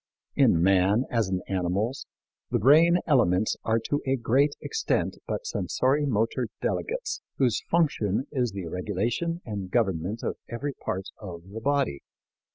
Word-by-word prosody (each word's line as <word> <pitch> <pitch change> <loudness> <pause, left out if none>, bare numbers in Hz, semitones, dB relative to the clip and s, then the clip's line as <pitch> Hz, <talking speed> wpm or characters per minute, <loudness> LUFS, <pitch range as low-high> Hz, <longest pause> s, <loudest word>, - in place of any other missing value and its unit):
In 85 - +4
man, 95 +5 +4
as 115 -5 +1
in 95 -1 -1
animals, 95 +7 -1 0.4
the - - +1
brain 160 - +6
elements 110 - +3
are 110 0 +2
to 145 +6 -1
a 135 - +3
great 135 +4 +2
extent 450 - -1
but - - -3
sensori 145 - 0
motor 115 +1 0
delegates 450 -2 -2 0.2
whose 125 -5 +2
function 135 - +1
is 125 -5 0
the 100 -2 -5
regulation 110 - -2
and 100 -4 -5
government 95 -1 0
of - - -2
every 140 +5 -3
part 95 -6 -4
of 85 -5 -8
the 110 +2 -6
body. 140 - 0
115 Hz, 145 wpm, -27 LUFS, 95-140 Hz, 0.4 s, brain